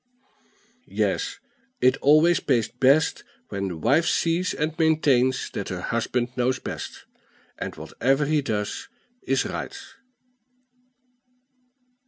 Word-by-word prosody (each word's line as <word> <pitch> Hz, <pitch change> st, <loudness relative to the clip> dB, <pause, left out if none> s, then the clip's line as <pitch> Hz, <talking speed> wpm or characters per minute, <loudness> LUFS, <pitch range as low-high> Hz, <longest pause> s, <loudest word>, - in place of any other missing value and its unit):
Yes, -, -, -1 dB, 0.4 s
it 130 Hz, -, +4 dB
always 155 Hz, +4 st, +5 dB
pays 120 Hz, -6 st, +1 dB
best 140 Hz, +4 st, +2 dB, 0.3 s
when 100 Hz, -1 st, -3 dB
the 90 Hz, -3 st, -5 dB
wife 140 Hz, -, +2 dB
sees 170 Hz, +2 st, +1 dB
and 155 Hz, +1 st, -1 dB
maintains 140 Hz, -5 st, +2 dB
that 100 Hz, -, -4 dB
her 95 Hz, -1 st, -4 dB
husband 120 Hz, +3 st, -1 dB
knows 125 Hz, +1 st, +1 dB
best, -, -, -7 dB, 0.5 s
and -, -, -5 dB
whatever 135 Hz, +3 st, 0 dB
he 150 Hz, 0 st, +2 dB
does 105 Hz, -6 st, -3 dB, 0.3 s
is -, -, 0 dB
right. -, -, -5 dB
130 Hz, 110 wpm, -25 LUFS, 120-155 Hz, 0.5 s, always